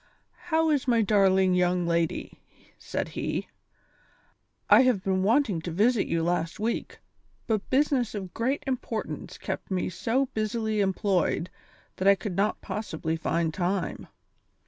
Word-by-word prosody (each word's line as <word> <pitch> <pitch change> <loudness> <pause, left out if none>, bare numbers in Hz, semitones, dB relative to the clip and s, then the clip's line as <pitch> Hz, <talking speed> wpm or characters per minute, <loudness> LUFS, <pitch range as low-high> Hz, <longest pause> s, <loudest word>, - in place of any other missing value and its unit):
"How 320 -1 +3
is 285 -3 0
my 235 -2 +4
darling 190 -2 +4
young 180 0 +2
lady?" 170 -1 -1 0.4
said - - -3
he. - - -3 1.2
"I - - +8
have 250 -7 +2
been 190 -1 +1
wanting 215 - +2
to 170 - -5
visit 215 +6 +2
you 165 -1 0
last 170 -1 -1
week, 225 +2 -2 0.5
but 215 -3 -1
business 265 -4 +1
of 190 -3 -6
great 260 +5 -1
importance 250 -4 -4
kept - - -5
me 185 -2 -1
so 245 +9 0
busily 215 0 -1
employed 190 -3 0 0.5
that 190 - 0
I 200 - +7
could 195 -2 -5
not 205 +3 0
possibly 160 -6 -3
find 165 0 -1
time. 185 0 -2
200 Hz, 140 wpm, -27 LUFS, 180-230 Hz, 1.2 s, I